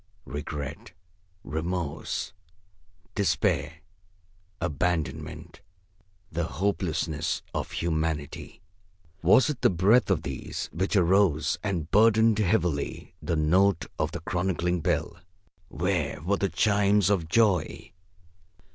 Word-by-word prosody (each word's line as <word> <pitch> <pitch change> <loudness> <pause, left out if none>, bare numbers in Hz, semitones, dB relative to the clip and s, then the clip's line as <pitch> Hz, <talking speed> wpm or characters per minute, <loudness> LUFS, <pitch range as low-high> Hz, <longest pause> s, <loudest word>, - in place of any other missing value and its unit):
Regret, 75 +1 -6 0.5
remorse, 80 +1 -3 0.8
despair, 80 -6 0 0.8
abandonment, 85 0 -3 0.7
the 80 +1 -1
hopelessness 80 -1 -1
of - - -3
humanity 80 -3 -3 0.6
was 130 0 +5
it 150 -6 -3
the - - +5
breath 100 +7 +3
of 85 -5 +1
these 70 -5 -5
which 95 +5 -1
arose 90 -4 +3
and 85 -6 -3
burdened 110 0 +5
heavily 90 -8 0
the 85 - -1
note 85 +3 +3
of 80 - 0
the 85 - -6
chronicling 90 0 -1
bell? 85 - -1 0.5
Where - - -1
were 100 +4 +1
the 100 - 0
chimes 105 -1 +3
of 85 -5 0
joy? 100 -6 +1
90 Hz, 100 wpm, -27 LUFS, 80-100 Hz, 0.8 s, was